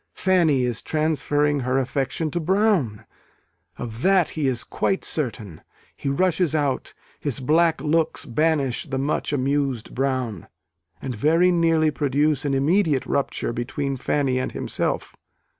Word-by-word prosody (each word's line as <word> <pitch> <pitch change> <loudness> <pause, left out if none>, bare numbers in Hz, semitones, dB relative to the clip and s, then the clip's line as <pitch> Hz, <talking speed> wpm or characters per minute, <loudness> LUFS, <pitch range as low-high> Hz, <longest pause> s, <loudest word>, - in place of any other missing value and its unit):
Fanny 170 -8 +2
is 120 -2 -1
transferring 150 -1 +1
her 130 0 0
affection 135 +4 -1
to 175 - -1
Brown: 180 - +1 0.7
of 115 -1 -7
that 190 -1 +3
he 150 -3 -2
is 125 -3 +1
quite 190 - -1
certain. 110 - -3 0.3
He 140 - -3
rushes 170 +2 +1
out: 145 -4 -1 0.2
his 140 -3 -2
black 160 +5 +2
looks 160 +1 0
banish 145 -1 0
the 135 -1 -3
much 140 +3 -1
amused 135 -3 -1
Brown, 130 - -2 0.6
and 130 - -3
very 165 +10 +3
nearly 165 -2 +3
produce 145 +1 +1
an 140 -1 +1
immediate 150 0 +2
rupture 140 -4 -1
between 135 +4 -3
Fanny 135 0 0
and 130 - -3
himself. - - -2
145 Hz, 135 wpm, -23 LUFS, 130-160 Hz, 0.7 s, that